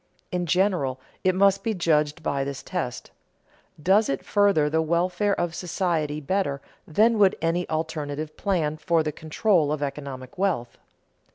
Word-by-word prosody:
In 180 -1 -1
general, 175 -8 +1 0.2
it 185 -1 +3
must 195 0 +3
be 225 -2 -1
judged 155 -3 +1
by 140 -1 0
this 140 0 -5
test: 165 -10 -4 0.7
Does 195 +7 +3
it 135 - -2
further 200 -7 +3
the 160 +2 +1
welfare 180 +5 +1
of 175 -1 -1
society 170 -4 -1
better 155 -2 -1 0.3
than 220 +7 +3
would 195 -2 +5
any 165 +2 -1
alternative 155 -1 -3
plan 160 -6 -1
for 165 0 +1
the 155 - -2
control 160 +1 +1
of 150 -1 -1
economic 140 0 -6
wealth? 170 -12 -1
165 Hz, 150 wpm, -25 LUFS, 150-185 Hz, 0.7 s, would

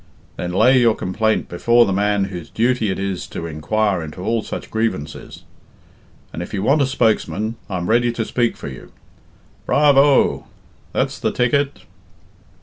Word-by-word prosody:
Then 90 - -4
lay 125 +8 +4
your 115 -3 +4
complaint 110 +4 -1
before 120 +7 +3
the 100 - -1
man 105 +1 +1
whose 90 -4 -6
duty 115 -1 +1
it 95 - -2
is 95 -2 -3
to 85 - -6
inquire 95 +5 -1
into 80 +3 -8
all 115 +2 0
such - - -7
grievances; 110 -10 -3 0.9
and 85 - -5
if 90 - -6
you 95 - -2
want 145 +6 +3
a 135 - +2
spokesman, 110 -3 0
I'm 90 -3 -3
ready 120 +1 +3
to 115 -2 -2
speak 120 0 0
for - - -8
you." 65 -3 -10 0.8
"Bravo!" 145 -1 +4 0.4
"That's - - -1
the - - 0
ticket!" 140 +3 0
110 Hz, 155 wpm, -20 LUFS, 95-120 Hz, 0.9 s, lay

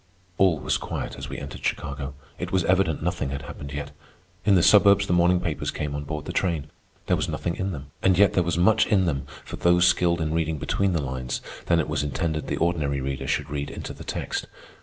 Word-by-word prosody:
All 95 -4 +5
was - - 0
quiet - - -4
as - - -7
we - - -5
entered 70 -2 -8
Chicago. 70 0 -3 0.2
It - - -4
was 95 -2 +2
evident 90 -5 +2
nothing 85 -5 -1
had 70 0 -4
happened 70 -1 -8
yet. 70 0 -5 0.5
In 100 - +5
the 90 - +4
suburbs 100 -1 +6
the 90 - 0
morning 90 +1 +4
papers 80 -4 -2
came 75 -1 -3
on 75 0 -4
board 75 0 -5
the - - -5
train. 80 -6 -1 0.3
There - - +2
was - - -2
nothing 85 - -2
in 95 +1 -2
them, 70 -4 -8
and 95 -2 +4
yet 100 0 +5
there 90 - +3
was 85 -1 -1
much 105 +5 +4
in 95 -4 +3
them 70 -5 -2 0.2
for - - -7
those 90 0 +4
skilled 85 -1 +3
in 80 -1 -1
reading 80 -1 0
between 100 +6 0
the 80 -4 0
lines 65 -1 -3 0.3
that 85 - +4
it 80 - +1
was 75 -1 -1
intended 75 +1 -2
the - - -1
ordinary 75 -5 0
reader 65 0 -3
should - - -1
read 70 -1 -3
into - - -6
the - - -10
text. - - -3
80 Hz, 230 wpm, -25 LUFS, 70-90 Hz, 0.5 s, suburbs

